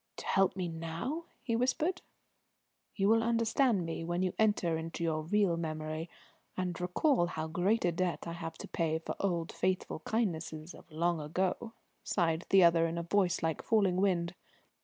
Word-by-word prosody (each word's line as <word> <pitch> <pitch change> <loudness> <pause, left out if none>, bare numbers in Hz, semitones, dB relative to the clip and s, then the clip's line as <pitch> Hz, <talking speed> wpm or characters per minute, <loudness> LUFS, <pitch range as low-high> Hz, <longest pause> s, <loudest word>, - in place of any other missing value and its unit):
"To - - -7
help 195 -1 +3
me 185 -2 -2
now?" 165 - -4 0.2
he 230 - 0
whispered. 300 +9 0 0.9
"You 195 -2 +2
will 225 +1 +5
understand 230 -3 +2
me 165 0 -4
when 175 +2 -1
you 185 - 0
enter 205 -6 +2
into 165 +1 -4
your 160 -1 0
real 180 +1 +2
memory 155 0 -4 0.5
and 180 -2 -2
recall 180 - +2
how 160 -2 -3
great 180 +7 +1
a 175 - +3
debt 175 +1 -1
I 170 - -4
have 165 -1 -6
to - - -8
pay 160 -1 0
for 160 - -5
old 170 -4 -1
faithful 185 -3 -1
kindnesses 165 -6 -2
of - - -15
long 170 +1 +1
ago," 185 +9 -2 0.3
sighed 165 -2 0
the 195 -1 +7
other 165 -1 +5
in 165 +1 -4
a 170 - -2
voice 180 -1 +1
like 160 -1 0
falling 200 -5 +2
wind. 180 -3 +1
175 Hz, 175 wpm, -32 LUFS, 165-200 Hz, 0.9 s, the